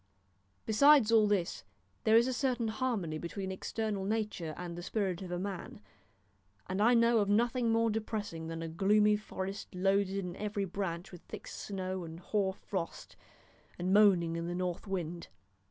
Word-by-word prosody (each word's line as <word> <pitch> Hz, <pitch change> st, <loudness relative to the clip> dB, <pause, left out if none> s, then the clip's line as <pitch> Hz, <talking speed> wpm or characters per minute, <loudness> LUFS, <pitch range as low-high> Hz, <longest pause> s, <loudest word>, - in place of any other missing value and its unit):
Besides 265 Hz, +1 st, +6 dB
all 220 Hz, -2 st, +6 dB
this, 195 Hz, -4 st, 0 dB, 0.4 s
there 220 Hz, -, +5 dB
is 235 Hz, -, +5 dB
a 260 Hz, -, 0 dB
certain 245 Hz, -3 st, 0 dB
harmony 215 Hz, -10 st, -2 dB
between 190 Hz, +3 st, -4 dB
external 205 Hz, +1 st, -3 dB
nature 205 Hz, -6 st, -2 dB
and 175 Hz, -1 st, -6 dB
the 175 Hz, -, -6 dB
spirit 190 Hz, -1 st, -2 dB
of 185 Hz, -, -6 dB
a 175 Hz, -, -1 dB
man, 200 Hz, +5 st, -5 dB, 0.9 s
and 190 Hz, +2 st, -2 dB
I 235 Hz, +3 st, +5 dB
know 230 Hz, 0 st, +5 dB
of 200 Hz, -1 st, +1 dB
nothing 235 Hz, +2 st, +2 dB
more 230 Hz, 0 st, +3 dB
depressing 210 Hz, -6 st, -3 dB
than 165 Hz, 0 st, -5 dB
a -, -, -3 dB
gloomy 210 Hz, +5 st, +3 dB
forest 195 Hz, -2 st, -6 dB
loaded 195 Hz, +1 st, +2 dB
in 180 Hz, -3 st, -4 dB
every 205 Hz, -1 st, -2 dB
branch 180 Hz, -1 st, -4 dB
with 180 Hz, -, -11 dB
thick -, -, -8 dB
snow 185 Hz, -2 st, -4 dB
and 165 Hz, 0 st, -8 dB
hoar 190 Hz, +1 st, 0 dB
frost, 185 Hz, -4 st, -5 dB, 0.6 s
and 180 Hz, +2 st, 0 dB
moaning 185 Hz, -6 st, +5 dB
in 170 Hz, 0 st, -3 dB
the 175 Hz, -, -3 dB
north 180 Hz, +2 st, -3 dB
wind. 175 Hz, -3 st, -4 dB
195 Hz, 170 wpm, -32 LUFS, 180-220 Hz, 0.9 s, Besides